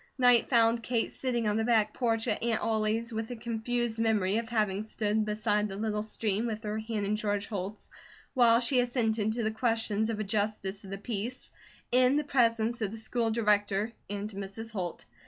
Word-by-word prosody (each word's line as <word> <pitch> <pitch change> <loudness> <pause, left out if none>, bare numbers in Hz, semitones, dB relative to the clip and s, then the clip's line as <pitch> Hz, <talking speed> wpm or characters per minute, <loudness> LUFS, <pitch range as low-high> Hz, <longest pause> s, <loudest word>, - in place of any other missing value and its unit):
Night 245 -2 +5
found 230 -1 +4
Kate 230 -1 -1
sitting 240 -4 -1
on 210 0 +1
the 225 - +1
back 220 -2 +2
porch 225 -3 0
at - - 0
Aunt 230 -1 +1
Ollie's 220 +1 0
with 220 0 -3
a 245 - -4
confused 235 0 -2
memory 215 -3 +2
of 230 0 -3
having 210 -4 +1
stood 215 0 -1
beside 210 0 0
the 195 - -6
little 210 0 -1
stream 215 0 -1
with 220 0 -4
her 210 0 -2
hand 220 -2 -3
in 205 +2 +1
George 205 -1 -1
Holt's 200 0 -5 0.5
while 235 -2 +5
she 250 +1 +3
assented 225 -3 +1
to 235 0 -2
the 220 - 0
questions 225 -2 0
of 220 -2 -2
a - - 0
Justice 205 -1 -2
of 195 - -10
the 195 - -4
Peace, 230 +4 -5 0.4
in 255 +3 +4
the 300 - +1
presence 235 -4 +1
of 210 - 0
the 225 - -7
School 225 +1 -1
Director 210 -1 +1 0.2
and 205 0 -3
Mrs. 200 +3 -6
Holt. 180 -5 -4
220 Hz, 195 wpm, -30 LUFS, 210-235 Hz, 0.5 s, Night